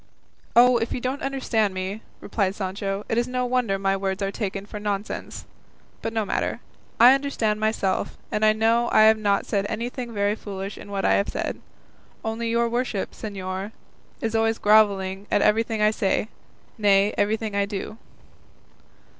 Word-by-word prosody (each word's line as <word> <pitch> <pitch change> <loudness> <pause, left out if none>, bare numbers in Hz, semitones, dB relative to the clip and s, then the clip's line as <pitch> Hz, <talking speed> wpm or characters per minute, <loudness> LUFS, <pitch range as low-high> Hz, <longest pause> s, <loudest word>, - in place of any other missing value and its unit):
"Oh, 245 +1 +7
if 225 0 -2
you - - -2
don't 255 +3 -3
understand 230 -7 0
me," 190 +3 -4 0.2
replied 195 -3 -1
Sancho, 195 +1 -3
"it 225 - +1
is 240 - 0
no 250 0 -1
wonder 245 -5 +1
my 195 0 +1
words 195 0 -2
are 195 - -1
taken 195 -2 -4
for 210 - -7
nonsense; 205 0 -4 0.6
but 225 - -3
no 220 -1 -1
matter; - - -1 0.4
I 245 +3 +9
understand 260 -6 0
myself, 215 -3 -1
and 210 - -1
I 215 - +6
know 225 +2 +2
I - - +6
have 220 0 +6
not 200 -2 +1
said 200 -1 -1
anything 240 +2 -4
very 205 -1 +1
foolish 200 -2 -6
in - - -11
what 200 -1 -2
I - - +4
have 200 - +1
said; - - -4 0.6
only 225 +1 -2
your 235 +1 +2
worship, 235 -4 -2
señor, 195 0 -5 0.5
is 225 0 -2
always 225 0 +2
gravelling 200 -2 +3
at - - +2
everything 220 0 +2
I 210 - +5
say, 210 0 0 0.5
nay, 200 0 +4
everything 215 0 0
I 200 0 +1
do." 205 +2 -6
215 Hz, 170 wpm, -24 LUFS, 200-230 Hz, 0.6 s, I